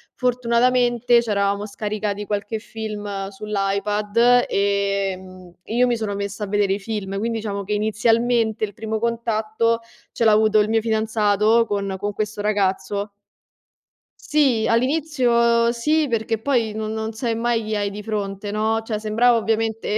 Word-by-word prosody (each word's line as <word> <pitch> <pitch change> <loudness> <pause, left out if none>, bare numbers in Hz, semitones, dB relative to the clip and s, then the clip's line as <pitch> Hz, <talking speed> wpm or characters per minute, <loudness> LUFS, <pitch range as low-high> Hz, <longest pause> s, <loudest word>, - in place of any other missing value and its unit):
Fortunatamente, 245 -1 +2
c'eravamo 200 -2 0
scaricati 210 0 -3
qualche 205 +1 -3
film 205 -3 -5
sull'iPad, 210 +4 +1
ehm, 195 -2 -2
io 240 +3 +2
mi 240 - +1
sono 210 -3 -3
messa 200 +1 -4
a - - -9
vedere 200 -1 +1
i 200 - -2
film, 195 -2 -4
quindi 230 +1 -2
diciamo 200 -2 -4
che 210 - -2
inizialmente, 225 +1 +1
il 205 -2 -2
primo 220 +1 -4
contatto 230 0 0 0.3
ce 230 - -1
l'avuto 215 0 +4
il 210 - 0
mio 225 0 +3
fidanzato 220 0 +2
con 200 -1 -2
con 205 0 -3
questo 210 0 -4
ragazzo. 200 0 -1 1.1
Sì, 270 -7 +2
all'inizio, 235 -3 +2
sì, 300 +6 +1
perché 225 -1 -1
poi 230 -3 0
non 215 0 -4
non 220 0 -3
sai 230 0 -2
mai 230 -1 0
chi 215 0 -3
hai 205 -1 0
di 210 +1 -7
fronte, 205 -2 -4
no, 220 +1 0
cioè, 220 -1 -3
sembrava 230 +3 +3
ovviamente 225 -1 -1
215 Hz, 145 wpm, -22 LUFS, 205-230 Hz, 1.1 s, l'avuto